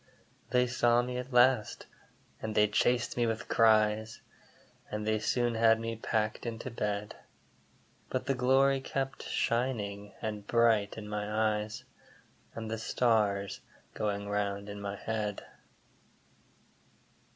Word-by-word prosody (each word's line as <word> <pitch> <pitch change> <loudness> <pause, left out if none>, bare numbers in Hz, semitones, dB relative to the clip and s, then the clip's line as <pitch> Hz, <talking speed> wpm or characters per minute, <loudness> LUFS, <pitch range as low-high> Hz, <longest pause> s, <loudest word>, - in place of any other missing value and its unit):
They 125 0 +3
saw 120 0 +3
me 125 0 -3
at 125 +2 -7
last, 125 -3 +3 0.6
and 110 -1 -4
they 105 0 +5
chased 120 +3 +1
me 120 -1 +2
with 115 0 -3
cries, 110 0 +3 0.7
And 105 0 -4
they 110 0 +1
soon 120 +2 +1
had 115 0 +4
me 115 0 -3
packed 110 +1 -2
into 115 +2 -5
bed; 105 -2 -3 0.9
But 130 - -2
the 135 - +1
glory 135 +2 +3
kept 135 0 -3
shining 105 -4 -1
and 105 -2 -5
bright 115 -4 +3
in 105 -1 -7
my 105 +1 0
eyes, 105 0 -7 0.7
And 110 -1 -5
the 115 - -2
stars 105 -4 +1 0.3
going 100 -1 -2
round 100 0 -2
in 100 0 -7
my 100 0 -4
head. 105 -1 -3
110 Hz, 130 wpm, -31 LUFS, 105-120 Hz, 0.9 s, they